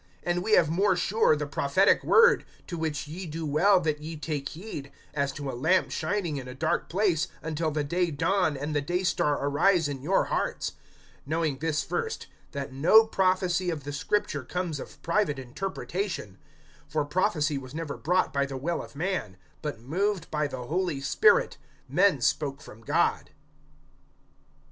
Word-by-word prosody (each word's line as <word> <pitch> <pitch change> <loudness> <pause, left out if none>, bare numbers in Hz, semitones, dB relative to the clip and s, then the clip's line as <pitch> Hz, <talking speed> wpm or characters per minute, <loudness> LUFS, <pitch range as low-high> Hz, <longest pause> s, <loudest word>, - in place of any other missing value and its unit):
(19)And 175 0 0
we 215 +4 0
have 170 -6 +6
more 185 +5 +2
sure 190 -1 +3
the 150 0 -3
prophetic 145 +7 +2
word; 470 +1 +6 0.2
to 175 - -6
which 155 -3 -3
ye 175 +4 -6
do 160 +1 -4
well 180 +7 +4
that 155 -3 -1
ye 160 +1 -6
take 145 -2 -3
heed, 155 -5 -8 0.2
as 140 -2 0
to 140 0 -6
a 135 - -3
lamp 160 +10 +2
shining 180 -8 -1
in 130 -2 -6
a 125 - -8
dark 160 +4 -1
place, 180 -3 +1 0.2
until 160 0 -1
the 150 -1 -1
day 175 +4 0
dawn, 165 +1 +1
and 150 +2 -3
the 145 - +2
day 175 +6 -1
star 150 -5 +1
arise 160 +3 +3
in 140 -2 -5
your 180 +8 +2
hearts; - - -2 0.6
(20)knowing 160 -4 0
this 155 -1 0
first, 465 -1 -3 0.3
that 140 -2 -5
no 180 +12 +6
prophecy 185 -3 +1
of 155 -4 -3
the 145 +1 -5
Scripture 145 0 -1
comes 175 0 -3
of - - -10
private 170 -5 +1
interpretation; 170 - -4 0.5
(21)for 150 -1 0
prophecy 155 -4 +1
was 130 +1 -10
never 160 -3 -4
brought 180 +5 +1
by 140 - +2
the 135 -1 -4
will 165 +6 -2
of - - -12
man; 160 - -2 0.2
but 145 -7 -5
moved 185 - -1
by 150 -1 0
the 130 -3 -6
Holy 170 0 -1
Spirit, 445 - +3 0.3
men - - +3
spoke - - 0
from - - -13
God. - - +1
160 Hz, 170 wpm, -27 LUFS, 145-185 Hz, 0.6 s, have